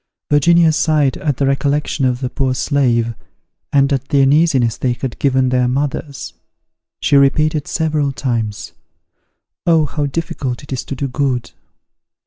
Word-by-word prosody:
Virginia 165 +3 +4
sighed 155 -3 +1
at 145 -5 -2
the 140 - +1
recollection 140 +1 0
of 125 0 0
the 130 - -2
poor 130 -2 -1
slave, 120 -2 +1 0.6
and 140 0 +3
at 135 0 -2
the 145 -3 +2
uneasiness 135 -5 +3
they 125 -2 -1
had 125 0 -6
given 130 -2 +2
their 125 -1 +2
mothers. 140 +2 -3 0.7
She - - +2
repeated 150 +2 +2
several 155 -3 0
times 115 -6 -3 1.0
"Oh, 165 -2 +4
how 145 0 -2
difficult 140 -4 -4
it 140 - -7
is 130 - -3
to 140 - -5
do 135 +2 -3
good!" 130 -2 -2
140 Hz, 145 wpm, -17 LUFS, 130-150 Hz, 1.0 s, Virginia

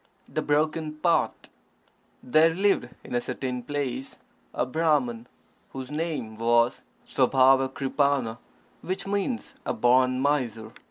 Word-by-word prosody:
The - - -2
Broken 155 +1 0
Pot 170 +2 0 0.8
There 160 +5 +4
lived 195 -9 +2
in - - -9
a 120 - +1
certain 125 0 -4
place 135 0 -4 0.3
a - - -1
Brahman, 130 -5 0 0.5
whose 130 0 -6
name 150 -9 -3
was 120 +2 +2 0.2
Svabhavak_ri_pa_n_a, 135 -1 +2 0.4
which 185 +1 -3
means 205 +5 -2
"a - - -2
born 130 +1 +3
miser." 125 -6 -1
135 Hz, 110 wpm, -26 LUFS, 125-155 Hz, 0.8 s, There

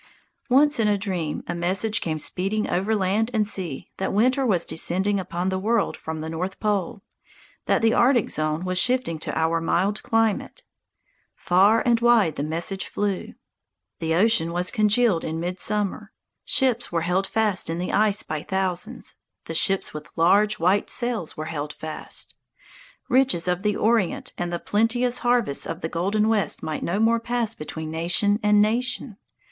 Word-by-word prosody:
Once 285 +3 +4
in 220 - +3
a 205 -1 +2
dream 185 -6 -3
a - - -3
message 185 +5 0
came 160 -2 -2
speeding 195 +7 -2
over 195 +5 0
land 205 +3 +1
and 215 -1 +2
sea 180 -10 -4
that 190 - -2
winter 255 +6 +2
was 190 -9 +2
descending 190 +5 0
upon 180 0 -3
the 190 0 -1
world 220 +1 0
from 160 -1 -6
the 160 - -5
North 180 +4 -4
Pole, 210 +1 -1 0.6
that - - +2
the 225 - +4
Arctic 240 -2 +3
zone 155 +3 -2
was 185 0 +1
shifting 250 -8 +1
to - - -4
our 165 +1 +1
mild 195 +5 0
climate. 225 - 0 0.7
Far 195 +5 +3
and 235 -2 +3
wide 230 -9 +4
the - - -3
message 170 +5 -2
flew. 205 -2 -3 0.6
The 160 0 0
ocean 180 -4 +3
was 180 +1 -1
congealed 215 -4 +2
in 160 0 -3
midsummer. 205 +4 -2 0.3
Ships 250 -3 +1
were 170 -1 0
held 180 +3 0
fast 215 -6 0
in 165 - -2
the 180 +1 -3
ice 210 0 +2
by 155 -1 -4
thousands, 190 -1 -3 0.3
the - - -5
ships 195 -1 +1
with 150 0 -8
large, 200 +6 +3
white 185 +5 +1
sails 240 -9 -2
were 155 - -4
held 150 -2 -4
fast. 155 -1 -5 0.7
Riches 250 -10 +2
of 180 +1 0
the 210 0 0
Orient 220 -4 0
and 175 0 -3
the 175 - -1
plenteous 240 +6 0
harvests 240 - +1
of 165 +2 -5
the 160 - -3
Golden 200 +6 0
West 215 -5 +1
might 155 -1 -3
no 185 +4 -1
more 230 +1 +3
pass 235 -1 -1
between 155 -2 -7
nation 175 +6 +1
and 210 0 +4
nation. 230 0 -1
195 Hz, 170 wpm, -24 LUFS, 170-220 Hz, 0.7 s, Once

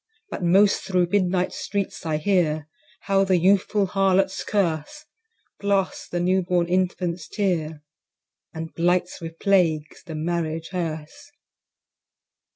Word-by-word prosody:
But - - -5
most 195 +4 +4
thro' 180 -2 +1
midnight 185 0 +1
streets 200 -4 -4
I 155 -1 0
hear 155 -4 +1 0.3
How 195 -1 +2
the 190 -2 +3
youthful 195 +3 +3
Harlot's 190 0 +1
curse 195 - -1 0.5
Blasts 200 -2 0
the 175 - -2
new 185 +2 +2
born 175 -1 +1
Infant's 180 -2 -1
tear, 160 -7 -2 0.7
And 160 0 -7
blights 175 +1 0
with 165 0 -7
plagues 165 -6 +1
the 165 -4 -7
Marriage 165 0 -2
hearse. 160 - -5
180 Hz, 120 wpm, -24 LUFS, 165-195 Hz, 0.7 s, most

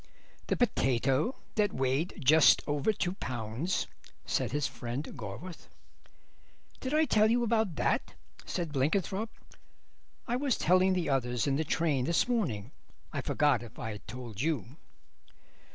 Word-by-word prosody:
"The - - 0
potato 135 - +2 0.2
that 205 -2 +1
weighed 135 +8 -1
just 155 +2 +7
over 145 +7 +1
two 185 -3 -1
pounds," 125 - -2 0.4
said - - 0
his 145 +1 0
friend 120 +3 -4
Gorworth. 125 - -8 1.1
"Did 260 - -4
I 310 +1 +4
tell 215 -5 +4
you 240 +1 +3
about 220 -6 +1
that?" - - 0 0.3
said 170 -4 -3
Blenkinthrope; 190 - 0 1.0
"I 240 - 0
was 270 -2 +1
telling 185 +2 +4
the 180 -4 0
others 125 -4 0
in 140 - +1
the 155 - +1
train 150 -4 +1
this 170 - +2
morning. 145 - -1 0.4
I - - -1
forgot 145 -5 +2
if 120 -2 -11
I'd 110 -2 -6
told 120 -4 -6
you." 145 -3 -2
150 Hz, 135 wpm, -31 LUFS, 125-195 Hz, 1.1 s, just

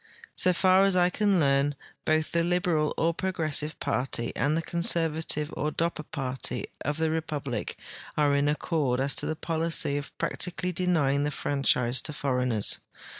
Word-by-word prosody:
So 185 - +4
far 185 +1 +4
as 195 -1 +4
I 180 0 +4
can 200 -2 +2
learn, 140 -1 +2 0.3
both 155 0 +1
the 170 - +2
liberal 175 -3 +1
or 165 +1 +2
progressive 155 -4 0
party 125 -2 -1
and 150 +3 +1
the 165 - -1
conservative 160 -3 -1
or 150 - -1
Dopper 165 +1 -1
party 130 -2 -3 0.2
of 150 +2 -1
the 160 -1 +1
republic 150 -7 -3 0.4
are 145 -1 +3
in 140 0 +2
accord 150 -4 0
as 135 +1 +2
to - - 0
the 160 - -1
polic}'' 160 -3 0
of 145 - -10
practically 180 0 -1
denying 155 -6 +1
the 145 - 0
franchise 130 -4 +1
to 150 - -3
foreigners. 125 -6 +1
155 Hz, 160 wpm, -27 LUFS, 140-170 Hz, 0.4 s, So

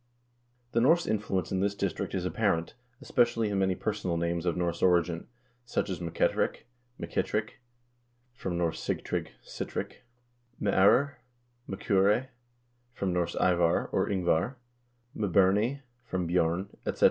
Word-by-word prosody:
The 115 - +2
Norse 165 +7 +4
influence 100 -4 -1
in 95 - 0
this 100 +1 0
district 100 -2 -2
is 90 -1 -2
apparent, 90 -4 0 0.3
especially 120 -3 +2
in 100 -1 0
many 95 -1 +2
per - - -1
sonal 85 -2 -2
names 85 +1 -1
of 85 - +1
Norse 85 -1 -1
origin, 85 -2 +2 0.4
such 105 - -2
as 90 - -3
M'Ketterick, 85 -2 0 0.4
M'Kittrick, 105 0 -2 0.8
from 95 -7 -4
Norse 85 -2 -1
Sigtrygg, - - -2 0.2
Sitric; - - -5 0.6
M'Eur, 105 +8 +4 0.5
M'Cure, 100 +5 +2 0.6
from 95 -6 -2
Norse 85 -1 -1
Ivar, 85 -2 +2
or - - +1
Ingvar; 95 +4 +1 0.6
M'Burney 105 +7 +2 0.2
from 95 -7 -2
Bj0rn; 85 +2 +1
etc. - - -3
95 Hz, 125 wpm, -29 LUFS, 85-105 Hz, 0.8 s, Norse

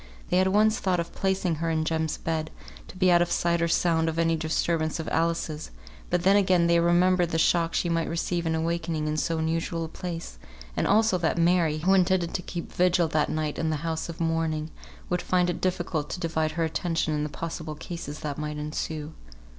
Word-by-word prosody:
They 180 - +3
had 185 - +3
once 215 +3 +3
thought 185 -2 +1
of 170 - -4
placing 190 -4 0
her 165 - 0
in 160 -1 0
Jem's 160 -1 -1
bed, 160 -1 -2 0.4
to - - -12
be 185 -1 +4
out 175 0 +5
of 175 - 0
sight 170 0 +1
or 170 - +2
sound 165 -1 +2
of 160 - -4
any 165 0 +2
disturbance 160 0 -1
of 160 - -4
Alice's, 165 -2 -1 0.4
but 175 -1 0
then 195 +2 +5
again 185 -4 +4
they 170 0 +4
remembered 175 +1 +3
the 165 - -1
shock 165 0 +2
she - - +1
might 165 -1 0
receive 170 0 -1
in 160 - +1
awakening 165 -1 -1
in 155 - -1
so 160 +2 0
unusual 165 +1 -1
a - - -5
place, 170 0 -6 0.4
and - - 0
also 215 -2 +3
that 165 0 0
Mary, 170 -2 +3
who 180 +5 +2
intended 185 -2 +2
to 180 - -1
keep 175 -1 -7
vigil 180 -1 +3
that 155 -1 +1
night 155 -1 -2
in 160 - 0
the 155 - 0
house 160 0 -2
of 165 - -7
mourning, 165 -1 -1 0.4
would 180 0 -1
find 180 -1 +2
it 175 - -6
difficult 175 -4 -1
to - - -4
divide 160 -2 -1
her 165 +1 0
attention 165 0 -1
in 150 - -1
the 150 - -2
possible 160 0 -5
cases 155 -2 -7
that 150 -1 -4
might 150 0 -4
ensue. 150 +1 -4
165 Hz, 215 wpm, -26 LUFS, 160-175 Hz, 0.4 s, out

